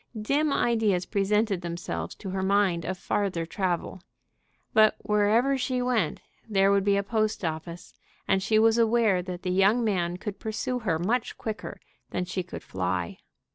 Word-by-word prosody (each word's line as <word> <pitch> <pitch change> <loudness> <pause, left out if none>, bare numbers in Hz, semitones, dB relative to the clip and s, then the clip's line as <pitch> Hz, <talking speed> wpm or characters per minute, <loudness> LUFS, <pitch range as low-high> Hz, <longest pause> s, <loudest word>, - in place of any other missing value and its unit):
Dim 285 +7 +1
ideas 220 -9 +1
presented 205 -1 +1
themselves 170 0 -5
to 195 - -7
her 190 0 -2
mind 190 -3 +2
of 185 0 -3
farther 185 -3 -1
travel. 180 0 -2 0.7
But 215 -1 +5
wherever 220 +6 +2
she 255 0 -1
went 245 -9 0 0.3
there 195 -1 +3
would 200 -1 +3
be 200 0 +3
a 200 - 0
post 215 -2 -1
office, 165 +2 -5 0.3
and 195 0 +2
she 215 +2 +2
was 225 +1 +4
aware 225 -5 +3
that 180 0 -7
the 180 - -1
young 200 +6 +3
man 180 -5 0
could 205 +1 -6
pursue 225 +3 -3
her 185 -9 0
much 220 +8 -1
quicker 220 -1 -6 0.3
than 180 - -2
she 185 +1 -3
could 175 - -9
fly. 90 -2 -3
200 Hz, 165 wpm, -27 LUFS, 180-220 Hz, 0.7 s, But